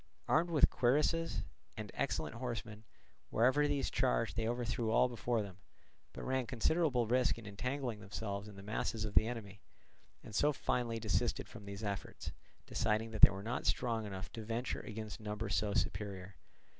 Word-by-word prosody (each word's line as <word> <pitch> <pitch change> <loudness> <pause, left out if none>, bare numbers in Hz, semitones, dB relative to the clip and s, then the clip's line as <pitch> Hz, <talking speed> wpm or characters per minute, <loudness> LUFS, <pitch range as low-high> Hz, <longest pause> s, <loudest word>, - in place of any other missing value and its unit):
Armed 170 +3 +3
with 160 -4 +5
cuirasses, 150 +6 +2 0.3
and - - -5
excellent - - -1
horsemen, 115 -3 -5 0.4
wherever 130 +6 +4
these 145 -2 0
charged - - +1
they 110 0 0
overthrew 120 -1 -1
all 115 - +5
before 120 -1 0
them, 95 -2 -10 0.5
but - - -7
ran 130 -2 0
considerable 130 0 +2
risk 125 +2 +2
in 115 - -10
entangling 125 +3 -3
themselves 100 0 -4
in 105 - -10
the 95 - -10
masses 110 +1 -1
of 105 - -4
the 110 - +5
enemy, 105 -4 -6 0.6
and 110 - -10
so 145 +8 +4
finally 120 -4 -1
desisted 110 -3 0
from 100 - -11
these 100 +1 -6
efforts, 100 -2 -4 0.3
deciding 110 +1 0
that 110 - -4
they - - +12
were 100 0 -6
not 115 +3 -2
strong 115 -3 +1
enough 95 -1 -6
to 115 - -6
venture 115 +3 -2
against 110 -1 -6
numbers 105 0 -3
so 105 -1 +1
superior. 95 -1 -2
115 Hz, 170 wpm, -35 LUFS, 105-125 Hz, 0.6 s, they